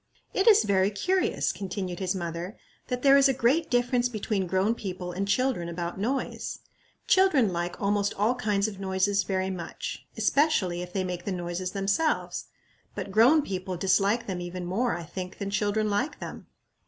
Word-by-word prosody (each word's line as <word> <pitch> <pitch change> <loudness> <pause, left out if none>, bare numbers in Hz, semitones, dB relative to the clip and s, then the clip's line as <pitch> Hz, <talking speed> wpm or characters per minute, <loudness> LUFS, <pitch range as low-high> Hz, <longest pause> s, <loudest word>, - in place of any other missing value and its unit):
"It 390 - +1
is 425 - +7
very 195 -2 +2
curious," 365 - 0
continued 185 -2 -5
his 185 -1 -1
mother, 175 +3 -5 0.3
"that 250 0 -3
there 275 0 +7
is 275 0 +5
a 265 - +1
great 275 +7 +2
difference 245 0 +2
between 210 -4 -2
grown 190 +5 +2
people 185 -5 -5
and 195 +3 -3
children 230 -6 +1
about 170 +1 -4
noise. 260 +6 -2 0.5
Children 300 - +4
like 175 +1 -3
almost 200 0 0
all 215 +5 +2
kinds 210 -4 0
of 200 -3 -7
noises 195 +1 +1
very 190 0 -1
much, 175 -3 -6
especially, 215 - +2
if 180 0 -7
they 190 0 -1
make 180 -1 -4
the 200 - -2
noises 180 0 -3
themselves; 200 +11 0 0.5
but 195 - -5
grown 250 +9 +5
people 185 -3 -4
dislike 195 +5 +2
them 185 -3 -4
even 175 0 -5
more, 225 +8 0
I 170 - -6
think, 180 +3 -7
than 200 0 -4
children 205 +2 +1
like 245 +9 -1
them. - - -8
200 Hz, 175 wpm, -27 LUFS, 185-240 Hz, 0.5 s, is